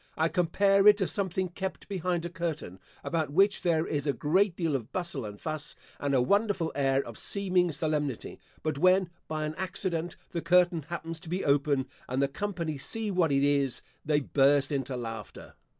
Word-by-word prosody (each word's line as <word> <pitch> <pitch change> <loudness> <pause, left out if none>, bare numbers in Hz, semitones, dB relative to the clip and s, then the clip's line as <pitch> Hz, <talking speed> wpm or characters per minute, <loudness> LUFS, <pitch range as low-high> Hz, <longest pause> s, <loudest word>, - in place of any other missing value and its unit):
I 160 +1 +2
compare 195 +4 +3
it 210 -1 +8
to 195 - +1
something 190 -1 -1
kept 190 +2 -5
behind 180 -3 -1
a - - -3
curtain, 165 - -4 0.2
about 160 -3 -1
which 195 +7 +3
there 165 -2 +2
is 145 -1 -2
a 140 - +2
great 180 +6 +2
deal 165 -5 0
of 125 -1 -4
bustle 170 -9 -3
and 105 -1 -8
fuss, 155 -1 -5 0.2
and 140 -1 0
a 125 - +4
wonderful 200 - +1
air 135 -1 +2
of 115 - -9
seeming 185 -3 +1
solemnity; 150 -5 -2 0.2
but 155 -3 -1
when, 185 +1 +4 0.2
by 155 -1 -2
any 155 +1 -4
accident, 180 -2 -3 0.2
the 170 - -2
curtain 175 -2 +3
happens 165 -1 -5
to 165 -1 -10
be 180 +3 -2
open 140 -1 +2 0.2
and 130 +1 -1
the 140 - +3
company 165 -1 -3
see 220 +8 -3
what 175 -5 +2
it 140 0 +3
is, 140 -2 +1 0.2
they 150 -1 +2
burst 140 +1 +3
into 135 -2 -2
laughter. 115 -2 -7
160 Hz, 185 wpm, -29 LUFS, 140-180 Hz, 0.2 s, it